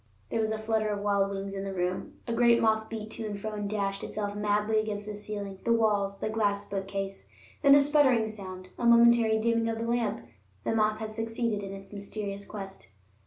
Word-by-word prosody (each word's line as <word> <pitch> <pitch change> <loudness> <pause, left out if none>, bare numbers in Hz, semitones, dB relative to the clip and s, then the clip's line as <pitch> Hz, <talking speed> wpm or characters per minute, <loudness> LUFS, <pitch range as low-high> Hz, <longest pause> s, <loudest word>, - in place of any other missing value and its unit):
There - - 0
was 220 -1 +1
a 220 - -1
flutter 220 0 0
of 205 -1 -2
wild 200 -1 +2
wings 195 0 -4
in 195 0 -4
the 195 -1 -4
room. 180 0 -2
A 235 - -1
great 235 0 +5
moth 220 -1 +2
beat 220 -1 -6
to 225 - -5
and 205 -1 -5
fro 215 +2 -4
and 205 -1 -3
dashed 200 -2 -2
itself 205 -1 -3
madly 210 +1 +1
against 210 -1 -3
the 210 0 -5
ceiling, 205 -2 -6
the 235 - +1
walls, 205 -3 +2
the - - -3
glass 205 -2 0
bookcase. 195 0 -4 0.3
Then 280 -1 +8
a - - +8
sputtering 280 -6 +4
sound, 185 -3 -8
a 240 - -1
momentary 235 -1 +6
dimming 230 +1 +1
of 225 - -2
the 230 - -3
lamp. 230 -3 -1 0.4
The - - 0
moth 215 -1 +2
had 215 0 -5
succeeded 225 -1 -2
in 195 -1 -6
its 195 +1 -10
mysterious 200 0 -5
quest. 195 -2 -8
215 Hz, 215 wpm, -29 LUFS, 200-225 Hz, 0.4 s, Then